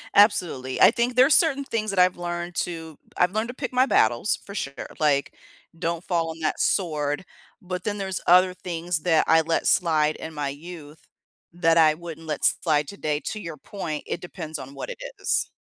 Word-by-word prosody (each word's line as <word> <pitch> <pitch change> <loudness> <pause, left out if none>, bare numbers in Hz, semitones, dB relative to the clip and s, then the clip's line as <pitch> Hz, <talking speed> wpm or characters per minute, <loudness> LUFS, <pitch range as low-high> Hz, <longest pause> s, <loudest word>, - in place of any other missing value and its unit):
Absolutely, 170 - +3
I - - +8
think 245 +1 -1
there's 260 +4 +6
certain 280 -4 +4
things 220 -4 -2
that 195 - -3
I've 180 0 +4
learned 175 0 -4
to 165 -3 -4 0.2
I've 180 0 +3
learned 220 +2 -1
to 245 - -6
pick 255 -2 -5
my 255 +2 +3
battles 120 - +2
for 200 - -9
sure. 140 -8 -4 0.3
Like, 145 -2 +1 0.4
don't 170 0 -2
fall 165 -2 -1
on 160 0 -7
that 155 - -1
sword, 150 -3 0 0.4
but 180 -1 -5
then 205 -1 -2
there's 190 -2 -3
other 180 +1 +6
things 175 -2 -3
that 160 -1 +3
I 160 0 +5
let 165 +1 -1
slide 155 -3 +2
in 160 - -8
my 145 -1 -2
youth 155 0 -11 0.4
that 165 -1 +2
I 155 -1 +5
wouldn't 165 -1 -9
let 150 -2 -1
slide 150 -3 +2
today, 155 -7 -3
to 215 - -4
your 165 -5 -7
point, 155 -3 -6
it 175 - -4
depends 160 -3 -6
on 135 +1 -9
what - - -6
it - - -6 0.2
is. - - +1
170 Hz, 195 wpm, -24 LUFS, 155-190 Hz, 0.4 s, I